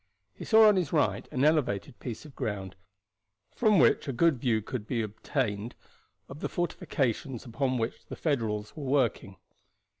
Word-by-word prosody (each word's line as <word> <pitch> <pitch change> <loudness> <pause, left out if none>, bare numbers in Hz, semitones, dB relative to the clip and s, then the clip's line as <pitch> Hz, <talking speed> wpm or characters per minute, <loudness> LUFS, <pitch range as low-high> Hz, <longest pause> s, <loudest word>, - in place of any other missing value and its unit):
He - - -9
saw 220 -1 +7
on 210 -2 +5
his 175 -6 0
right 150 -5 +1
an 135 -1 +1
elevated 140 -6 +1
piece 120 +3 -6
of 150 - -12
ground, 95 -3 -4 0.8
from 215 -4 +4
which 145 - +4
a - - 0
good 150 +1 +2
view 115 -3 +1
could 110 0 -6
be 115 -4 -1
obtained 110 +1 -3 0.5
of 135 - -10
the - - -3
fortifications 135 -7 -2
upon 130 +2 -1
which 115 0 -4
the - - -6
Federals 110 -8 -2
were 150 -3 -6
working. 130 -7 0
130 Hz, 160 wpm, -29 LUFS, 110-150 Hz, 0.8 s, saw